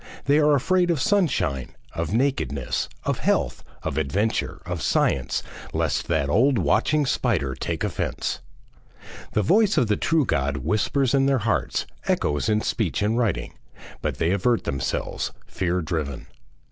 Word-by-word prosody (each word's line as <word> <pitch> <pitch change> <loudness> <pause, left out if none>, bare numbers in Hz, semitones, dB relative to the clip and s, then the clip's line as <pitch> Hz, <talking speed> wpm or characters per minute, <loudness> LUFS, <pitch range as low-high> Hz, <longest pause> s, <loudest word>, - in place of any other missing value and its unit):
They 145 +2 +4
are 150 -1 +5
afraid 180 +6 +2
of 165 -4 +1
sunshine, 130 - +1 0.2
of 85 0 -3
nakedness, 115 - 0
of - - -1
health, - - 0 0.2
of 70 - -1
adventure, 100 +10 -1
of - - -4
science, - - +1 0.3
lest - - 0
that 80 -4 +1
old 120 - +3
watching 130 - +2
spider 70 - 0
take 65 - -3
offence. - - -2 0.9
The 105 - +2
voice 210 - +3
of 125 - +4
the 105 - +2
true 160 -4 +2
God 70 - 0
whispers 110 - +1
in 135 -1 +4
their 135 -1 +3
hearts, 110 -5 0 0.2
echoes 75 +7 +1
in 105 0 +2
speech 105 -3 -1
and 110 +2 +1
writing, 115 -6 0 0.5
but - - -2
they 80 - +1
avert 110 +5 +2
themselves, 65 -2 -2
fear 90 -1 -1
driven. 75 -5 -3
105 Hz, 145 wpm, -24 LUFS, -, 0.9 s, are